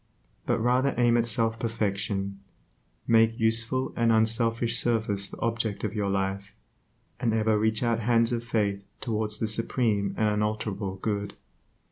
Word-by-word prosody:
But - - +2
rather 125 +4 +2
aim 120 -1 +4
at 115 0 +1
self 115 -1 0
perfection, 100 -3 -2 0.7
make 115 0 +3
useful 115 +3 +1
and 115 -1 +2
unselfish 115 +1 +2
service 110 -4 0
the - - -10
object 115 -3 -2
of - - -2
your 105 -2 -1
life, 100 +1 -2 0.7
and 115 -3 +1
ever 110 0 +2
reach 110 +2 +1
out 115 -1 +1
hands 115 +1 +2
of 120 -1 -2
faith 105 -4 -1 0.2
towards 110 -3 -1
the 110 - -1
supreme 110 -2 0
and 110 - +2
unalterable 105 -2 -2
Good. 100 +1 -3
110 Hz, 145 wpm, -27 LUFS, 105-115 Hz, 0.7 s, aim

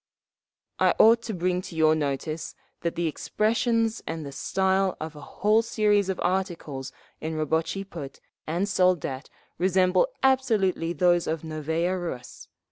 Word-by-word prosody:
"I - - +4
ought 230 +1 +6
to - - -1
bring 180 +1 0
to 180 - -10
your 155 -1 +4
notice… 155 +1 -3 0.3
that 170 - -2
the 170 - -1
expressions 225 - 0
and 160 -2 -4
the 140 - -6
style 190 +6 0
of 155 0 -6
a 150 - -10
whole 210 +9 +2
series 210 -3 +2
of 190 - -2
articles 175 -8 -2 0.3
in 160 0 -4
Rabotchi 160 +5 -1
Put 145 -7 -8 0.3
and 175 +6 0
Soldat 180 -8 +1 0.3
resemble 185 - +3 0.2
absolutely 220 -11 +2
those 175 +1 +3
of 160 0 -2
_Novaya 160 +4 -1
Rus…. 125 -8 -7
175 Hz, 140 wpm, -26 LUFS, 155-195 Hz, 0.3 s, ought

